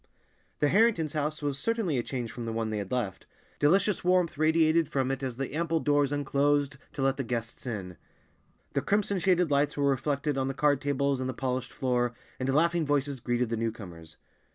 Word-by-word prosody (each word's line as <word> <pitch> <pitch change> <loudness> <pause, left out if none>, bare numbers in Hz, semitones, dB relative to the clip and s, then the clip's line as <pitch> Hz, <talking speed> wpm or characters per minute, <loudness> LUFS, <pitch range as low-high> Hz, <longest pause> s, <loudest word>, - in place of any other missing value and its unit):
The 145 - +4
Harringtons' 195 -6 +3
house 155 0 -2
was 140 -1 -1
certainly 210 - 0
a - - +1
change 120 -2 -4
from 120 - -6
the - - -2
one 110 -1 -2
they 105 - -2
had 100 -2 -6
left. 115 -7 -3 0.3
Delicious 190 +6 +3
warmth 180 -2 +2
radiated 160 +1 +3
from 135 -1 0
it 135 0 -3
as 130 -3 -4
the 135 0 -4
ample 165 +1 0
doors 145 -2 +2
unclosed 145 0 +1 0.2
to 135 - -3
let 135 0 +2
the 135 - -1
guests 120 +1 -4
in; 95 -7 -5 0.8
the - - +1
crimson 200 -1 +1
shaded 180 -3 +2
lights 145 +1 +2
were 140 -1 +2
reflected 140 +1 0
on 130 - 0
the 135 - -3
card 145 -1 +2
tables 140 -1 0
and 130 0 -2
the 130 - -4
polished 130 -1 -2
floor, 125 -2 0 0.2
and 130 +1 -1
laughing 165 +4 +2
voices 145 -2 0
greeted 120 0 0
the 115 - -1
newcomers. 90 -9 -6
140 Hz, 200 wpm, -28 LUFS, 125-155 Hz, 0.8 s, The